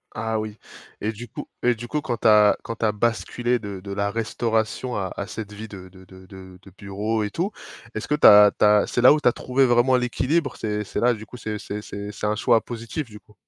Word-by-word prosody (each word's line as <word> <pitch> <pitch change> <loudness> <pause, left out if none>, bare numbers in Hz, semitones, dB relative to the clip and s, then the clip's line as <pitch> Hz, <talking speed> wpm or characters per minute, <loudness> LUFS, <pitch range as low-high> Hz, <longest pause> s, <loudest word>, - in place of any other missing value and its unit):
Ah 110 0 -2
oui 110 0 -6 0.4
et 105 - -1
du 115 +3 -9
coup - - -8
et 125 0 +2
du 120 +2 -8
coup 150 +3 -2
quand 125 -6 -3
tu - - +1
as 105 -1 +6
quand 115 - -5
tu 115 - -1
as 105 - +3
basculé 120 +2 -1
de 100 -3 -7
de 100 +2 -9
la 100 0 -1
restauration 115 +2 -2
à 95 -3 -3
à 100 - -5
cette 105 -2 -7
vie 110 +2 -8
de 95 -3 -11
de 95 0 -16
de 95 0 -15
de 95 -1 -13
de 95 - -17
bureau 105 +3 -2
et 105 - -2
tout. 180 - -2 0.4
Est-ce 110 - -5
que 150 - +1
tu - - +1
as 105 0 +9
tu - - +4
as 105 0 +4
c'est 125 - -1
là 125 - +8
où 155 - +1
tu - - +2
as - - +1
trouvé 130 +1 +1
vraiment 120 +2 +4
l'équilibre? 130 +4 -1
C'est 105 -1 -2
c'est 100 - -4
là 120 +1 +3
du 110 -1 -9
coup 125 - -11
c'est 110 -2 -5
c'est 105 +1 -6
c'est 100 0 -7
c'est 105 - -6
un 105 - 0
choix 115 +2 +3
positif 120 +5 -6
du 105 -2 -12
coup? 105 - -24
110 Hz, 265 wpm, -23 LUFS, 105-120 Hz, 0.4 s, as